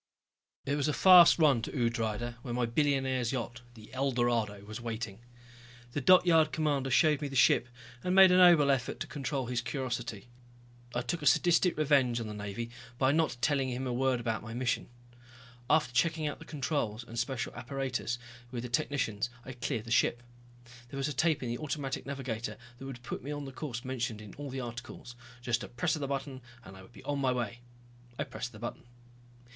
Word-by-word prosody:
It 140 - 0
was 145 - 0
a 150 - +1
fast 180 -1 +8
run 145 -8 +4
to - - -5
Udrydde 115 -2 -1
where 120 -2 -4
my 125 -1 +1
billionaire's 130 -1 +1
yacht, 120 -2 -4
the 110 -2 -14
Eldorado, 120 -6 0
was 110 +2 -7
waiting. 110 -3 -5 0.7
The 145 - -2
dockyard 165 -1 +5
commander 145 -4 0
showed 150 +2 +4
me 145 - -2
the 135 - -7
ship, 130 -1 +4 0.3
and 180 0 0
made 190 -1 +9
a 180 - +5
noble 170 -6 +7
effort 130 -3 -1
to - - -1
control 135 -1 -3
his 120 0 -1
curiosity. 120 -4 -4 0.7
I 120 - +1
took 165 +7 -3
a 150 - 0
sadistic 175 +3 +4
revenge 135 -6 +3
on 115 - -4
the 105 - -6
Navy 105 +3 -5 0.3
by 130 +1 +3
not 155 -4 +1
telling 135 0 +1
him 125 +1 -3
a 125 - -2
word 130 0 +1
about 115 -3 -2
my 110 +1 -8
mission. 120 -2 -1 0.8
After 150 -6 +3
checking 160 +4 +1
out 150 - -3
the - - -11
controls 135 -6 -2
and 115 0 -6
special 125 0 -2
apparatus 125 -1 -3 0.3
with 120 -1 -5
the 125 - -5
technicians, 120 -5 -1 0.2
I 135 - -6
cleared 120 -3 -3
the 115 - -8
ship. 120 0 +2 0.7
There 135 - -7
was 135 +2 -1
a - - -3
tape 155 0 +1
in 120 - -3
the 120 - -3
automatic 145 -3 -4
navigator 120 -6 -4 0.2
that 135 - -8
would 125 -2 -8
put - - -5
me 140 - -6
on 145 -1 -4
the 135 - -7
course 130 -3 -6
mentioned 120 -4 -3
in 105 -2 -11
all 145 -1 -7
the 130 0 -4
articles, 120 0 -8 0.3
just 120 -1 0
a - - -6
press 120 +5 -1
of 155 - -6
a 140 - -2
button 135 -1 -4 0.2
and 95 - -11
I 95 - -12
would 95 - -16
be - - -14
on 145 -1 -2
my 130 -2 +2
way. 120 -2 -3 0.6
I 145 - 0
pressed 120 -3 -6
the 110 - -12
button. 120 +2 -6
130 Hz, 205 wpm, -31 LUFS, 120-145 Hz, 0.8 s, made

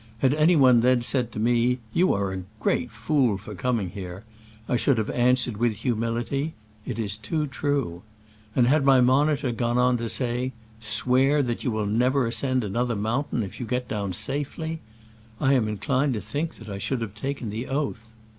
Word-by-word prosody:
Had 130 +3 +2
any 155 +4 +4
one 130 -5 +6
then 125 0 +3
said 120 -1 -1
to - - -6
me, 120 +2 +2 0.2
"You 180 +2 +3
are 100 -1 -1
a 95 - -4 0.2
great 125 +3 0
fool 115 0 +1
for 100 +2 -9
coming 110 -2 -1
here," 95 0 -7 0.4
I - - +1
should 125 +2 +2
have 110 -1 -1
answered 125 -2 +2
with 115 -1 +1
humility, 120 +6 -2
" 105 0 -30
It 120 - -3
is 105 -3 0
too 130 +9 -2
true." 135 - -2 0.5
And 125 - +4
had 140 +4 +3
my 135 -1 +6
monitor 135 +2 +3
gone 120 +1 0
on 125 0 +3
to 115 -1 -3
say, 125 +1 -1
" 110 0 -26
Swear 125 +6 +2
you 125 0 -2
will 110 -2 -1
never 125 +5 +2
ascend 130 +2 0
an 100 -2 -4
other 120 0 0
mountain 115 +4 -1
if 95 - -8
you 120 - -4
get 125 +1 -2
down 100 -3 -3
safely," 150 - -3 0.6
I 135 - +3
am 120 -5 +2
inclined 130 +5 0
to 105 - -3
think 145 -6 -4
I 100 -2 -5
should 125 +4 -2
have 110 -4 -4
taken 125 -1 -4
the 115 +4 -4
oath. 135 -5 -2
120 Hz, 195 wpm, -25 LUFS, 110-135 Hz, 0.6 s, one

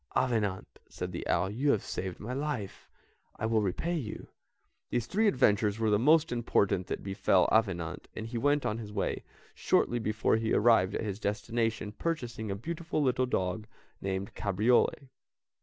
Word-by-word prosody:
"Avenant," 105 -7 -1
said - - -5
the - - -5
owl, 95 - +1
"you 135 +7 0
have 110 -7 +2
saved 95 -1 -5
my 115 +4 -5
life, 135 -7 -4 0.5
I - - -3
will 110 -1 +2
repay 105 - -1
you." 125 -10 -5 0.6
These 120 -2 -1
three 215 - +1
adventures 105 - +3
were 110 -1 +1
the 105 - +4
most 155 +6 +4
important 100 -6 +1
that - - -4
befell 95 -1 +2
Avenant, 90 -6 0
and 110 - -5
he 115 +1 -4
went 145 +3 +2
on 105 +2 -1
his 105 -2 -7
way, 100 -1 -2 0.3
shortly 120 - +1
before 110 0 +1
he 110 0 -1
arrived 105 -4 +4
at - - -2
his 100 -1 -4
destination 110 +1 -1
purchasing 120 -6 -3
a 100 - -1
beautiful 160 +6 -3
little 130 -1 +2
dog 105 0 -1 0.3
named 95 0 -3
Cabriole. 115 +6 +1
110 Hz, 165 wpm, -30 LUFS, 100-125 Hz, 0.6 s, the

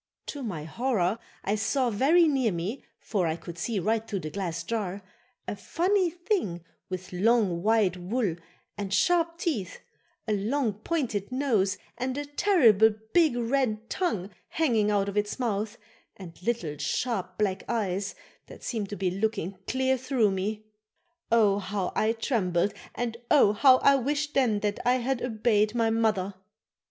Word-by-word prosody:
To 290 - -6
my 185 - -4
horror 215 +2 0 0.2
I 200 - 0
saw 245 +4 +1
very 310 +11 +4
near 265 -7 +2
me, 185 +9 -4 0.2
for 190 -6 -1
I 160 - 0
could 170 0 -9
see 230 +2 -2
right 220 +4 0
through 200 -4 -3
the 155 - -6
glass 170 -4 -3
jar, 200 -1 -3 0.4
a - - -3
funny 365 - +1
thing 345 - -2 0.2
with 185 0 -6
long 200 -2 +2
white 210 -3 +2
wool 190 0 -1 0.4
and 200 -2 -3
sharp 335 - +2
teeth, 295 - -2 0.5
a 215 - +1
long, 225 +3 0
pointed 220 - -2
nose 230 -8 +1 0.2
and 255 +2 -2
a 290 - -3
terrible 280 - +5 0.2
big 320 -8 +4
red 230 -2 -1
tongue 215 - -1 0.2
hanging 230 -10 +1
out 200 -1 +1
of 200 +1 -4
its 205 0 0
mouth 220 -2 -2 0.4
and 175 -4 -10
little 180 -9 -2
sharp 190 -5 -2
black 195 -3 0
eyes 195 -4 -1 0.3
that - - -13
seemed 215 -5 -3
to 205 - -4
be 190 -2 -1
looking 195 -2 -2
clear 260 0 +1
through 245 -5 +2
me. 210 +3 -3 0.7
Oh! 210 -3 +4
how 195 -1 -2
I 220 +1 +2
trembled 205 -6 0 0.2
and 235 -1 -3
oh! 260 -9 +6
how 255 +4 +6
I 280 +1 +5
wished 290 +3 -1
then 230 -6 +2
that 210 -1 -1
I 250 +1 +3
had 255 0 -1
obeyed 215 -2 +1
my 225 -1 +2
mother. 215 -4 +1
220 Hz, 160 wpm, -27 LUFS, 195-255 Hz, 0.7 s, oh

